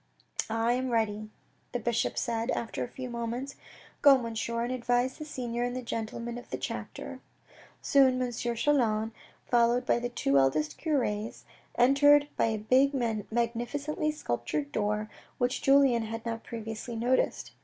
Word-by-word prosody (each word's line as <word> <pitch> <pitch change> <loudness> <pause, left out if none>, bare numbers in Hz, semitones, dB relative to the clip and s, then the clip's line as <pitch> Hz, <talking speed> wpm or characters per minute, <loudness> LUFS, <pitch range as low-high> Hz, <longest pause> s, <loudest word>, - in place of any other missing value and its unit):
" - - -2 0.2
I - - +4
am 255 +1 -1
ready," 215 -2 0 0.4
the 245 - 0
bishop 235 0 0
said 230 -1 -1
after 230 - -2
a - - -4
few 255 +1 -7
moments. 240 +3 -4 0.2
" - - -24
Go, 280 -2 +8
Monsieur, 230 -1 -2
and 245 +2 -2
advise 245 +1 0
the 305 - -5
senior 240 -5 -4
and 245 0 -2
the 255 - -4
gentlemen 235 +1 -4
of 245 - -15
the - - -3
chapter." - - -6 0.6
Soon 265 -2 +4
M. 250 -1 -1
Chelan, 230 -2 +1 0.3
followed 240 +1 +3
by - - +2
the 245 0 -3
two 140 - +2
oldest 150 +3 +1
cures, 235 -9 -1 0.3
entered 290 +3 +5
by - - +2
a 220 -1 0
big 260 +6 +3
magnificently 240 +6 -1
sculptured 145 - -3
door, 210 +2 -1 0.3
which 245 0 0
Julien 270 -4 +5
had 225 +1 -6
not 230 -1 -3
previously 225 +1 -6
noticed. 245 +3 0
235 Hz, 155 wpm, -29 LUFS, 225-255 Hz, 0.6 s, Go